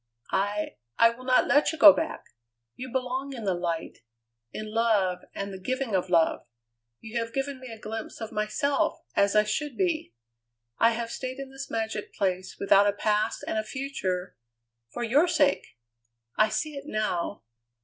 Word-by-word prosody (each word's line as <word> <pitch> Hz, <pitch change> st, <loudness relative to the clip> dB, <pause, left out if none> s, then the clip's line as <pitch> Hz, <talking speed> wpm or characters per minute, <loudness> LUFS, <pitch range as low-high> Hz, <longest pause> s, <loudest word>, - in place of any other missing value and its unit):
"I 205 Hz, +2 st, -1 dB, 0.2 s
I 230 Hz, 0 st, +6 dB
will 250 Hz, +2 st, -12 dB
not 255 Hz, -1 st, +4 dB
let 290 Hz, +1 st, +4 dB
you 320 Hz, -, -6 dB
go 305 Hz, -2 st, +10 dB
back! 320 Hz, -, -3 dB, 0.5 s
You 255 Hz, 0 st, -7 dB
belong 260 Hz, +2 st, -2 dB
in 235 Hz, -4 st, -7 dB
the 195 Hz, -2 st, +1 dB
light; 170 Hz, -2 st, -3 dB, 0.5 s
in 215 Hz, -, -5 dB
love 210 Hz, -6 st, +2 dB, 0.2 s
and 200 Hz, 0 st, -4 dB
the 190 Hz, -, -7 dB
giving 255 Hz, +3 st, -2 dB
of 185 Hz, -1 st, 0 dB
love. 165 Hz, -2 st, +2 dB, 0.5 s
You 225 Hz, +1 st, -3 dB
have 230 Hz, 0 st, -5 dB
given 270 Hz, 0 st, -2 dB
me 255 Hz, -, -9 dB
a 225 Hz, -, -8 dB
glimpse 220 Hz, +1 st, -6 dB
of 220 Hz, -2 st, -6 dB
myself 275 Hz, +7 st, 0 dB, 0.2 s
as 200 Hz, +1 st, +3 dB
I 210 Hz, -, +6 dB
should 260 Hz, +7 st, -3 dB
be. 340 Hz, -, -1 dB, 0.6 s
I 230 Hz, 0 st, +5 dB
have 230 Hz, 0 st, -4 dB
stayed 255 Hz, 0 st, -5 dB
in 275 Hz, -1 st, -7 dB
this 270 Hz, 0 st, -7 dB
magic 220 Hz, -2 st, -3 dB
place 185 Hz, -2 st, -1 dB
without 200 Hz, +1 st, +5 dB
a 205 Hz, -, +2 dB
past 210 Hz, +1 st, 0 dB
and 220 Hz, -, -1 dB
a -, -, -1 dB
future 215 Hz, -8 st, -3 dB, 0.6 s
for 240 Hz, -, -4 dB
your 280 Hz, +9 st, +4 dB
sake! 290 Hz, -, +1 dB, 0.6 s
I 215 Hz, 0 st, +4 dB
see 300 Hz, +8 st, -2 dB
it 280 Hz, 0 st, -7 dB
now. 210 Hz, -, -2 dB
225 Hz, 175 wpm, -27 LUFS, 200-270 Hz, 0.6 s, go